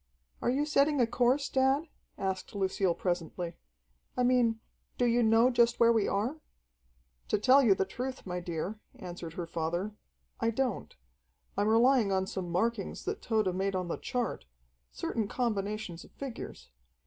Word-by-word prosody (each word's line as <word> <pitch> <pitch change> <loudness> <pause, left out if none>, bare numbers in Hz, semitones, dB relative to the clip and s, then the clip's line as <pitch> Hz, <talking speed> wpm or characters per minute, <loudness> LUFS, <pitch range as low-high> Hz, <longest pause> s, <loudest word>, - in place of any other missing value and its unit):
"Are - - +1
you 275 +4 +1
setting 295 -1 +3
a 245 - +5
course, 250 +4 +2
dad?" 265 +3 +2 0.3
asked 190 +1 -3
Lucille 190 -2 +1
presently. 175 -1 -2 0.6
"I 250 - +2
mean, 245 -3 +3 0.4
do 245 - +2
you 240 0 +3
know 225 +2 +5
just 240 0 +3
where 235 0 +6
we 220 -3 +2
are?" 235 +11 -1 0.9
"To - - +2
tell 260 +6 +6
you 215 -7 +5
the 190 - 0
truth, 255 +4 -5
my 180 -1 -3
dear," 175 +4 -4 0.2
answered 175 -2 -7
her 175 0 -4
father, 170 +5 -2 0.5
"I 230 - +2
don't. 245 0 -2 0.6
I'm 205 - +1
relying 230 -1 +4
on 190 0 +1
some 190 -2 -4
markings 200 +3 -1
that - - -3
Tode 215 -5 +1
made 195 +1 -1
on 180 -2 -2
the - - -2
chart 245 -2 -3 0.5
certain 210 - -2
combinations 210 -6 -2
of - - -16
figures. 255 - -8
220 Hz, 160 wpm, -31 LUFS, 185-245 Hz, 0.9 s, where